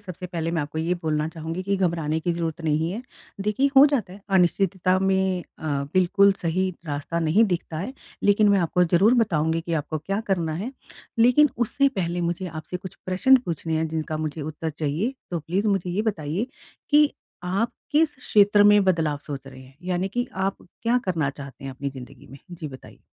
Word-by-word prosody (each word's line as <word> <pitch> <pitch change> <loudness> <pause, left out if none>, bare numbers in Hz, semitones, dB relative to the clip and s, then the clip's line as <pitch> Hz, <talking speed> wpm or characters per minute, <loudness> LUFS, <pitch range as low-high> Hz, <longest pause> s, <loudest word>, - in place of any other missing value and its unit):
सबसे 180 -2 -7
पहले 165 -2 -3
मैं 165 -2 0
आपको 150 +2 -5
ये 170 +3 0
बोलना 155 -1 0
चाहूँगी 165 +2 -5
कि 200 +1 0
घबराने 165 -4 0
की 175 +2 0
ज़रूरत 165 -1 -3
नहीं 160 +2 +1
है। 225 +6 -5 0.4
देखिए, 210 +8 +1
हो 275 - +10
जाता 245 -11 -1
है। 200 - -12 0.2
अनिश्चितता 185 0 +2
में 190 -1 +1 0.2
अ, - - -10 0.3
बिल्कुल 195 +2 +5
सही 185 +3 +1 0.2
रास्ता 145 +3 -3
नहीं 170 +8 +4
दिखता 175 -4 -2
है, 200 +10 -4 0.3
लेकिन 205 +1 +4
मैं 200 -1 +4
आपको 180 +1 +2
ज़रूर 190 +7 +4
बताऊँगी 165 -8 +1
कि 170 +1 -5
आपको 155 0 -2
क्या 195 +7 -2
करना 170 -5 0
है। 210 +10 -4 0.5
लेकिन 250 +6 +6
उससे 275 +4 +2
पहले 175 -7 -2
मुझे 175 +2 -2
आपसे 160 +2 -6
कुछ 185 0 -9
प्रश्न 190 +9 +5
पूछने 165 -1 -3
हैं, 160 - 0
जिनका 155 0 -3
मुझे 155 0 -4
उत्तर 155 +1 -4
चाहिए। 155 - -2 0.2
तो 170 -2 -2
प्लीज़ 185 +7 -1
मुझे 195 -3 0
ये 205 +4 0
बताइए 185 0 -2 0.4
कि 295 0 +6 0.3
आप 200 +7 0 0.2
किस 300 0 +3
क्षेत्र 205 -4 +4
में 205 0 +6
बदलाव 160 -5 +1
सोच 135 -2 -7
रहे 130 -1 -11
हैं, 130 +1 -17
यानी 180 +1 -1
कि 245 +5 -2
आप 190 +1 -1 0.3
क्या 240 +2 +3
करना 160 -7 0
चाहते 140 -1 -10
हैं 135 - -4
अपनी 140 +1 -4
ज़िंदगी 130 -2 -11
में? 135 - -12
जी, 165 -3 -6
बताइए। 130 -1 -12
175 Hz, 195 wpm, -24 LUFS, 160-200 Hz, 0.5 s, हो